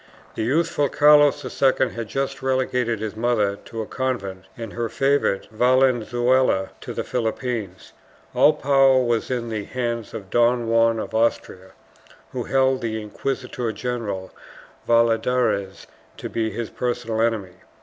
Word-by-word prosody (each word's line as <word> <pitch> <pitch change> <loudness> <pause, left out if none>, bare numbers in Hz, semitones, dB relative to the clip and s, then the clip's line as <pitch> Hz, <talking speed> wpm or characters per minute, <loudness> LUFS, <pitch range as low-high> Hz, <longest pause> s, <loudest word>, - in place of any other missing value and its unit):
The - - -4
youthful 145 +4 +1
Carlos 145 -1 +5 0.2
II 130 -1 +3
had 115 -2 -6
just 135 +3 -3
relegated 130 -3 0
his 110 0 -4
mother 110 -3 +1
to 115 -1 -5
a - - -8
convent 100 -9 -3
and 115 -3 -7
her 120 -1 -2
favorite 135 -7 +1
Valenzuela 125 -2 +2
to - - -7
the - - -2
Philippines; 115 -4 -4 0.4
all 155 - +5
power 135 -3 +4
was 120 -2 0
in 120 -2 -2
the 110 -2 -4
hands 120 -3 -4
of 100 -4 -8
Don 120 0 +2
Juan 115 0 +3
of - - -5
Austria, 105 -4 -1 0.6
who - - -4
held 130 -1 +2
the 110 -1 -2
inquisitor 125 +2 -4
general 105 -5 -4 0.6
Valladares 115 -3 +1 0.3
to - - -6
be 110 -1 -1
his 110 +1 -5
personal 115 -2 -2
enemy. 105 -6 -1
120 Hz, 140 wpm, -23 LUFS, 110-130 Hz, 0.6 s, Carlos